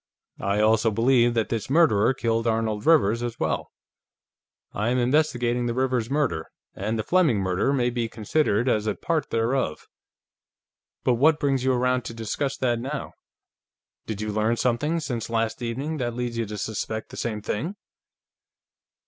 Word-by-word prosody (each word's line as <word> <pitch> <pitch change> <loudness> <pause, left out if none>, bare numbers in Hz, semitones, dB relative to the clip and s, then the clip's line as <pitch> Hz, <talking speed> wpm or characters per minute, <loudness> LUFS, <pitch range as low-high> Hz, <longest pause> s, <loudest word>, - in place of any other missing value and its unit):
"I 100 +2 0
also 110 +1 +4
believe 120 +2 +3
that 115 -2 0
his 115 -1 -2
murderer 135 -8 +4
killed 115 -1 0
Arnold 110 0 -1
Rivers, 120 -9 +4
as 120 -1 -4
well. - - -1 1.0
I 105 +3 -1
am 125 - +1
investigating 125 -2 +1
the 120 - -2
Rivers 130 -3 0
murder, 140 - 0 0.3
and 110 +4 -2
the 110 - -1
Fleming 170 - +3
murder 95 +6 +1
may 125 -3 +1
be 120 -2 -2
considered 115 +1 0
as 110 -3 +1
a - - 0
part 165 -2 -1
thereof. 115 - -1 1.2
But 125 - +3
what 155 +1 +5
brings 135 -3 +1
you 130 0 +3
around 125 0 +1
to 115 - -6
discuss 115 +5 -2
that, 120 -2 0
now? 135 +4 -4 1.0
Did 110 -2 -4
you 105 0 -2
learn 110 +2 +1
something, 145 +8 0
since 120 -8 -4
last 115 +1 -1
evening, 135 +7 -3
that 120 -3 -2
leads 120 -1 -3
you 115 -1 -2
to 105 +1 -6
suspect 110 +1 -4
the - - -10
same 110 -3 -3
thing?" 150 - -3
120 Hz, 165 wpm, -25 LUFS, 110-130 Hz, 1.2 s, what